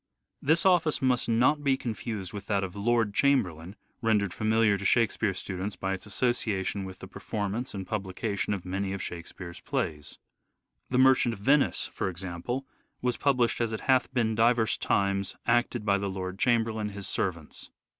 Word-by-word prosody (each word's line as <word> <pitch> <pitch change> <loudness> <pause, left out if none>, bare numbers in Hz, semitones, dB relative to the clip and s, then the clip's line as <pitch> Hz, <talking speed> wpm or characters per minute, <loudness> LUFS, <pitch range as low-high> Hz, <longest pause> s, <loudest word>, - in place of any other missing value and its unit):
This 160 +5 +3
office 175 -5 +4
must 130 -4 +1
not 130 +6 +3
be 135 -2 +3
confused 110 -6 -4
with 100 -1 -7
that 100 -2 +1
of 95 0 -5
Lord 110 0 +1
Chamberlain, 100 - +1 0.3
rendered 105 -5 +2
familiar 110 -1 +3
to - - -6
Shakespeare 110 -2 +2
students 95 +2 -4
by 95 0 -2
its 95 - -6
association 100 -3 -1
with 95 0 -8
the 95 - -10
performance 105 +5 -4
and 95 -1 -4
publication 100 +1 -2
of 95 - -8
many 95 +1 -2
of 100 - -4
Shakespeare's 85 0 -7
plays. 75 -2 -3 0.3
" - - -51
The 125 - 0
Merchant 130 -2 +5
of - - -15
Venice," 140 +6 +3
for - - -1
example, 95 +9 -4 0.4
was 125 -1 +1
published 125 -4 +1
"as 115 -1 0
it 110 - -4
hath 130 -1 +2
beene 115 -3 +1
diverse 115 0 +3
times 100 -1 0
acted 120 -1 +1
by 100 -1 +3
the 100 0 -2
Lord 95 0 -5
Chamberlain, 115 -3 +1
his 100 -1 -6
servants." 85 -5 -3
105 Hz, 170 wpm, -28 LUFS, 95-120 Hz, 0.4 s, Merchant